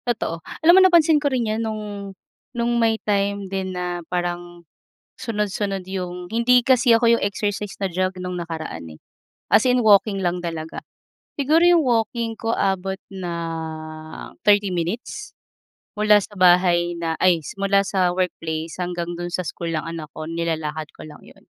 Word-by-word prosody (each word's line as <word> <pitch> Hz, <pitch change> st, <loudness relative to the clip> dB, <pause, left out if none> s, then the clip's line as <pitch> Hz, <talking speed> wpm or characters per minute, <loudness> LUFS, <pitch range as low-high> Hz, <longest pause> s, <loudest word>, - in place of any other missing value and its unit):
Totoo, 195 Hz, -8 st, -2 dB, 0.2 s
alam 340 Hz, -, +8 dB
mo 380 Hz, -, +8 dB
napansin 335 Hz, -5 st, +5 dB
ko 290 Hz, -, +1 dB
rin 255 Hz, -3 st, 0 dB
yung 215 Hz, +1 st, -1 dB
nung 220 Hz, -1 st, -3 dB, 0.8 s
nung 235 Hz, 0 st, +1 dB
may 225 Hz, -1 st, +3 dB
time 200 Hz, -1 st, 0 dB
din 190 Hz, 0 st, -3 dB
na 175 Hz, -1 st, -3 dB
parang 175 Hz, -1 st, -4 dB, 0.5 s
sunod-sunod 205 Hz, -3 st, -2 dB
yung 180 Hz, -2 st, -5 dB
hindi 235 Hz, +3 st, +4 dB
kasi 245 Hz, -1 st, +4 dB
ako 230 Hz, 0 st, +4 dB
yung -, -, -4 dB
exercise 205 Hz, 0 st, -2 dB
na 195 Hz, -, 0 dB
jog 185 Hz, +2 st, -1 dB
nung 180 Hz, 0 st, -4 dB
nakaraan, 160 Hz, -, -6 dB
eh, 80 Hz, -, -17 dB, 0.5 s
as 220 Hz, -, +5 dB
in 250 Hz, 0 st, +3 dB
walking 205 Hz, -2 st, +4 dB
lang 175 Hz, -1 st, 0 dB
talaga. 165 Hz, -2 st, -5 dB, 0.6 s
Siguro 305 Hz, +4 st, +3 dB
yung 350 Hz, -1 st, +6 dB
walking 230 Hz, -1 st, 0 dB
ko 225 Hz, 0 st, -1 dB
abot 190 Hz, 0 st, 0 dB, 0.2 s
ng 160 Hz, -3 st, -6 dB
30 205 Hz, -1 st, +4 dB
minutes, 180 Hz, +7 st, -4 dB, 0.6 s
mula 210 Hz, 0 st, +5 dB
sa 205 Hz, -, -9 dB
bahay 175 Hz, -1 st, +4 dB
na 165 Hz, -1 st, -2 dB
ay 175 Hz, -3 st, +4 dB
simula 200 Hz, 0 st, +1 dB
sa 185 Hz, -2 st, +1 dB
workplace 165 Hz, -3 st, -3 dB
hanggang 175 Hz, -1 st, -3 dB
do'n 175 Hz, 0 st, -5 dB
sa -, -, 0 dB
school 165 Hz, +3 st, -4 dB
ng 155 Hz, -, -1 dB
anak 165 Hz, -2 st, -6 dB
ko 155 Hz, -, -6 dB
nilalakad 160 Hz, -2 st, -3 dB
ko -, -, -9 dB
lang -, -, -13 dB
'yon. -, -, -18 dB
185 Hz, 160 wpm, -22 LUFS, 170-220 Hz, 0.8 s, alam